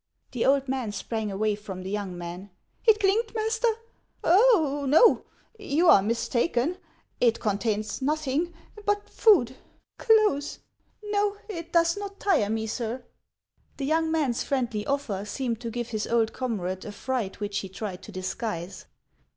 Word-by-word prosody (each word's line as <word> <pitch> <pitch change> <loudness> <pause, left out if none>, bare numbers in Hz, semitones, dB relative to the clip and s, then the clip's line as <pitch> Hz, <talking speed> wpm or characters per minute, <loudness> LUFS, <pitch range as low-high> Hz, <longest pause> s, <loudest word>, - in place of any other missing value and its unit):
The 245 -1 0
old 275 0 +3
man 260 -5 -2
sprang 215 +1 -3
away 210 +2 0
from 200 -3 -7
the 190 - -5
young 200 -4 -3
man. 175 +3 -7 0.2
" - - -35
It 430 -1 +6
clinked, 435 +3 +1
master? 445 +2 +1 0.6
Oh, 335 - +4
no! 325 - +6 0.3
you 335 -3 +2
are 195 - +8
mistaken. 240 - 0 0.4
It 235 -2 +3
contains 210 +2 -1
nothing 305 +3 0 0.2
— 420 -1 -15
but 410 0 +1
food, 260 - +4 0.4
clothes. 425 - +3 0.6
Xo, 410 0 +1
it 340 -5 -7
does 335 +1 +3
not 400 -1 -6
tire 320 - +2
me, 220 0 -1
sir." 235 +2 -4 0.7
The 275 - -3
young 320 +2 +1
man's 290 -7 0
friendly 240 -6 -2
offer 275 -9 -1
seemed 230 +1 -3
to 235 - -4
give 240 +1 -4
his 215 -2 -2
old 230 -1 +1
comrade 190 -7 -3
a 210 - -6
fright 220 -2 -3
which 205 -1 -2
he 195 - -6
tried 190 -1 -6
to - - -11
disguise. 185 -1 -5
250 Hz, 155 wpm, -26 LUFS, 210-335 Hz, 0.7 s, are